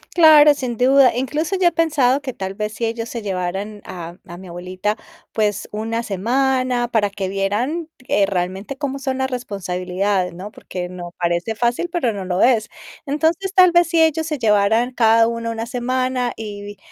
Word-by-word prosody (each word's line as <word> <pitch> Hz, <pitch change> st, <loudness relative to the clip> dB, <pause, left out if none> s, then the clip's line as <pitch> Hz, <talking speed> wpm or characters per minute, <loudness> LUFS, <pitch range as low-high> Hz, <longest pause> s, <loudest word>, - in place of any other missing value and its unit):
Claro, 305 Hz, -3 st, +8 dB
sin 250 Hz, -5 st, -4 dB
duda. 260 Hz, -1 st, +5 dB
Incluso 300 Hz, +8 st, -1 dB
yo 350 Hz, -2 st, +5 dB
he -, -, -15 dB
pensado 290 Hz, -5 st, +2 dB
que 260 Hz, -3 st, -5 dB
tal 190 Hz, 0 st, -5 dB
vez, 210 Hz, +1 st, -4 dB
si 230 Hz, -, -2 dB
ellos 230 Hz, 0 st, -3 dB
se 235 Hz, -3 st, -5 dB
llevaran 195 Hz, +2 st, -3 dB
a 170 Hz, -1 st, -8 dB
a 175 Hz, -, -9 dB
mi 185 Hz, 0 st, -11 dB
abuelita, 185 Hz, +4 st, -3 dB, 0.4 s
pues, 210 Hz, -2 st, -1 dB
una 225 Hz, +2 st, -3 dB
semana 250 Hz, +4 st, 0 dB
para 215 Hz, -4 st, +1 dB
que 195 Hz, -1 st, -4 dB
vieran, 230 Hz, -, -1 dB, 0.2 s
eh, 200 Hz, -1 st, +2 dB
realmente 190 Hz, +7 st, -3 dB
cómo 275 Hz, -1 st, -3 dB
son 265 Hz, -1 st, -2 dB
las 265 Hz, 0 st, -1 dB
responsabilidades, 185 Hz, -4 st, -2 dB
¿no? 200 Hz, +4 st, -8 dB
Porque, 180 Hz, -4 st, -6 dB
no. 175 Hz, -1 st, -9 dB
Parece 175 Hz, +5 st, -1 dB
fácil, 240 Hz, +9 st, 0 dB
pero 255 Hz, -11 st, 0 dB
no 195 Hz, -2 st, -5 dB
lo 180 Hz, 0 st, +1 dB
es. 235 Hz, -4 st, +3 dB, 0.4 s
Entonces, 325 Hz, +7 st, 0 dB
tal 365 Hz, -2 st, +7 dB
vez 345 Hz, 0 st, +4 dB
si 335 Hz, -1 st, +3 dB
ellos 320 Hz, 0 st, +1 dB
se 305 Hz, -2 st, -2 dB
llevaran 220 Hz, +2 st, +2 dB
cada 225 Hz, -1 st, +4 dB
uno 230 Hz, 0 st, -3 dB
una 225 Hz, 0 st, -3 dB
semana 255 Hz, 0 st, -1 dB
y 205 Hz, -2 st, -7 dB
230 Hz, 180 wpm, -20 LUFS, 195-265 Hz, 0.4 s, Claro